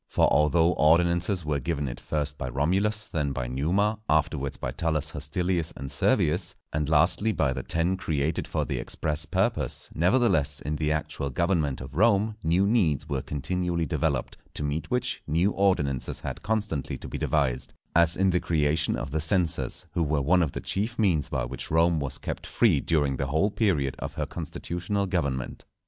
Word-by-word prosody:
For - - +3
although 80 +4 +4
ordinances 85 +3 +3
were 75 -2 0
given 75 0 -2
it - - -5
first 75 -1 -2
by 65 - -4
Romulus, 95 - 0
then 75 -6 -2
by 60 -2 -3
Numa, 90 - 0
afterwards 75 -3 +1
by 60 - -3
Tullus 80 +2 -1
Hostilius 85 +3 -1
and 70 +1 -6
Servius, 75 +6 +1 0.2
and 75 -1 -1
lastly 90 +7 +3
by 75 -10 +1
the - - -4
Ten 85 +3 0
created 80 -3 -1
for - - -1
the - - -2
express 75 -2 -2
purpose, - - -1
nevertheless, 85 - +2
in 75 +2 -3
the 75 0 0
actual 75 -2 -2
government 80 -2 0
of 65 +1 -8
Rome 105 +4 +3
new 85 +4 +3
needs 90 - +2
were 70 -4 -1
continually 85 +5 -2
developed, - - -1 0.2
to - - -3
meet 75 +1 -2
which, 125 -1 -1
new 85 +7 +2
ordinances 75 -11 0
had - - -5
constantly 105 -9 -2
to - - -9
be - - -5
devised; 65 -5 0 0.2
as 85 0 +4
in 95 0 +3
the 90 - +2
creation 80 -1 +1
of 70 - -5
the 80 +1 -1
censors, 85 +1 0
who - - -1
were 75 -2 +1
one 90 +6 +3
of 80 -5 0
the - - -4
chief 110 +5 -2
means 90 -10 +2
by 65 -2 -1
which - - -7
Rome 80 0 +3
was 70 -1 -4
kept - - -5
free - - +3
during 70 -5 +1
the 70 - -1
whole 80 +9 +1
period 80 - +1
of - - -5
her - - -1
constitutional 90 +4 -3
government. 70 -9 -2
80 Hz, 180 wpm, -27 LUFS, 70-90 Hz, 0.2 s, although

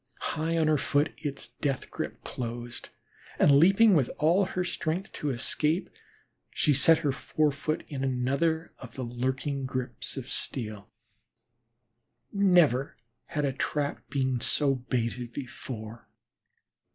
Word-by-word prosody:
High 165 +2 -1
on 160 - +3
her 155 -2 +3
foot 145 +3 +1
its 145 -2 -3
death 140 -3 -3
grip - - -5
closed, 120 0 -6 0.5
and 140 - +6
leaping 195 +8 +6
with 140 -8 +3
all 175 +6 +3
her 180 -1 -2
strength, 170 +1 -2
to 150 - -3
escape, 150 +6 0 0.6
she 150 - +2
set 150 +4 +6
her 140 - +3
fore 150 +3 0
foot 155 +3 -3
in 135 -2 -4
another 140 +6 0
of 120 -3 -11
the 130 - -4
lurking 130 +3 -2
grips 130 0 -4
of 130 -2 -5
steel. 105 -7 -3 1.4
Never 175 - +3 0.3
had 150 -2 -2
a 135 - 0
trap 145 +2 -2
been 130 -3 0
so 140 +4 +3
baited 120 -2 -3
before. 115 -4 -7
140 Hz, 130 wpm, -28 LUFS, 125-155 Hz, 1.4 s, and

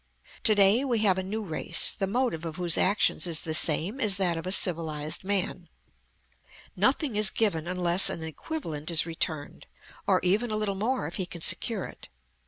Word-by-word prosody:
To 215 - +6
day 205 +5 +4
we 250 -4 -1
have 190 -3 +3
a - - -1
new 210 +4 -5
race, 160 -6 +1
the 195 - -4
motive 235 -6 -2
of 165 -2 -6
whose 175 -1 -2
actions 195 -1 +1
is 165 -2 -1
the 160 - -4
same 165 - +2
as 205 -4 +5
that 180 -3 0
of 165 +2 -6
a - - -2
civilized 160 -5 -1
man. 185 -3 -1 1.1
Nothing 285 -9 0
is 210 -1 +2
given 170 -8 -1
unless 180 0 +3
an 165 - -5
equivalent 160 - -6
is 165 -2 +2
returned, 160 -3 -3 0.4
or - - +3
even 205 +7 +1
a 215 - -2
little 210 -2 -2
more 230 +7 -2
if - - -5
he 185 -3 -3
can 170 -2 -10
secure 215 +3 +3
it. - - -13
185 Hz, 190 wpm, -26 LUFS, 165-215 Hz, 1.1 s, To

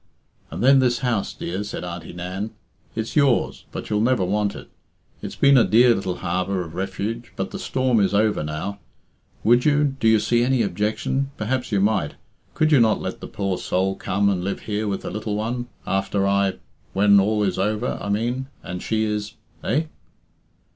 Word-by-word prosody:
"And - - -4
then 135 +1 +7
this 125 -2 +2
house, 115 -5 0
dear," 95 +4 -4
said 105 - -6
Auntie 85 -1 -6
Nan. 90 +4 -4 0.5
"It's 110 0 -4
yours, 140 -5 +2
but - - -6
you'll 105 0 +2
never 120 -4 +2
want 100 +2 0
it. - - -10 0.5
It's - - -6
been 140 -1 +6
a - - +6
dear 120 +2 +5
little 95 -4 -2
harbour 90 +1 -1
of 80 -2 -10
refuge, 105 +6 -4
but - - -3
the - - -5
storm 130 -3 +1
is 100 - +2
over 105 -1 +2
now. 80 +7 -4 0.6
Would 120 +3 +5
you 150 -1 +3 0.2
do 115 - +2
you 110 -1 +5
see 120 +3 +2
any 125 -1 +2
objection 105 +8 -1
perhaps 125 +4 -2
you 100 -2 +2
might 100 -7 +1 0.4
could 155 0 +2
you 145 - +6
not 110 -2 +4
let - - -5
the - - -7
poor 100 -2 -2
soul 95 +1 0
come 100 +2 0
and 95 -3 +1
live 100 +1 -3
here 105 0 -2
with 100 -1 -2
her - - -4
little 105 -1 -3
one, 120 +3 -2 0.2
after 95 +1 0
I 100 -1 +2 0.4
when 100 +1 +5
all 105 +2 +2
is 95 -2 0
over, 105 +5 -1
I 100 - -4
mean 120 +6 -1 0.2
and 90 0 -5
she 110 -1 0
is 105 0 -2 0.3
eh?" 145 +8 +1
105 Hz, 190 wpm, -23 LUFS, 95-120 Hz, 0.6 s, then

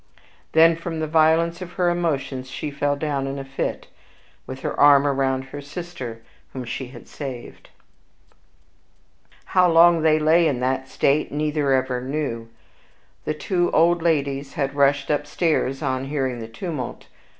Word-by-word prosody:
Then, 165 +1 +6
from 165 -1 -5
the 160 - -1
violence 165 +2 +2
of 180 -1 -8
her 175 -1 +1
emotions, 140 -6 -2
she 140 +3 -5
fell 145 0 0
down 140 -2 -2
in 135 +1 -4
a 135 - -6
fit, 135 0 -4 0.6
with 130 0 -7
her - - -2
arm 145 -1 +7
around 135 -1 0
the 145 - -6
sister 145 -7 -7 0.3
whom 130 -2 -5
she 125 +2 -5
had 120 -2 -13
saved. 130 -5 -8 1.8
How 180 -1 +5
long 170 0 +6
they 155 -1 +4
lay 160 +2 +4
in 130 -5 -1
this 130 +1 -2
state 145 +2 +1
neither 150 -1 0
ever 130 -1 +1
knew. 130 -4 -4 0.8
The 155 - -1
two 175 +2 0
old 170 +1 +4
ladies 140 -4 0
had 135 -1 -1
rushed 140 0 +2
upstairs 145 -2 0
on 130 0 -1
hearing 135 -3 -2
the 110 - -6
tumult. 130 +2 -6
145 Hz, 150 wpm, -23 LUFS, 135-160 Hz, 1.8 s, arm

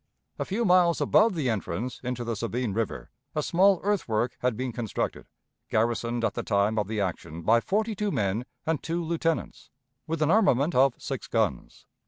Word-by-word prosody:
A - - -1
few 220 +5 -1
miles 180 -3 +4
above 215 -3 +4
the 150 -6 -1
entrance 110 +1 -3
into 125 -1 -3
the 115 -1 -2
Sabine 115 0 -2
River, 115 +2 -3 0.2
a 150 - 0
small 190 +3 +4
earthwork 125 - 0
had 125 -3 0
been 130 0 -2
constructed, 115 -2 -3 0.4
garrisoned 115 +1 0
at - - 0
the - - -3
time 100 +2 +1
of 105 - -1
the 110 0 -3
action 85 -4 -4
by 115 +5 +5
forty 215 - 0
two 210 +1 -1
men 105 - -1 0.2
and 160 -2 0
two 170 +1 -2
lieutenants, 165 0 -2 0.4
with 160 -1 0
an 155 - +2
armament 175 - +3
of 130 0 +4
six - - -5
guns. - - -2
125 Hz, 180 wpm, -27 LUFS, 110-170 Hz, 0.4 s, by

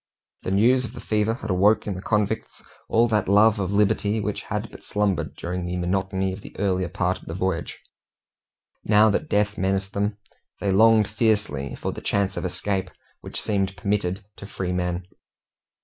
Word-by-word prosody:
The - - -4
news 120 +7 +4
of 115 - -6
the - - -8
fever 110 +1 0
had 110 -5 -5
awoke 100 +4 +3
in 105 - -2
the 95 - -6
convicts 105 +1 -1 0.3
all 115 +1 +4
that 105 -2 +1
love 105 +2 +5
of 95 -1 -1
liberty 105 +1 +2
which 105 0 -2
had 105 +1 -4
but - - -13
slumbered 105 -5 -1
during 90 +1 -4
the 90 +1 -3
monotony 95 +1 -1
of 100 - -8
the - - -12
earlier 95 -3 0
part 90 0 -1
of - - -17
the 80 - -6
voyage. 95 -2 -2 1.1
Now 105 +1 +5
that - - -1
death 105 0 +1
menaced 95 +1 0
them, 100 +1 -1 0.4
they 100 - 0
longed 110 +1 +5
fiercely 105 - 0
for - - -3
the - - -8
chance 100 -1 0
of - - -3
escape 95 +1 -2 0.3
which - - -5
seemed 95 -2 -1
permitted 100 0 -1
to 100 - -9
freemen. 90 -2 -2
100 Hz, 180 wpm, -24 LUFS, 95-105 Hz, 1.1 s, love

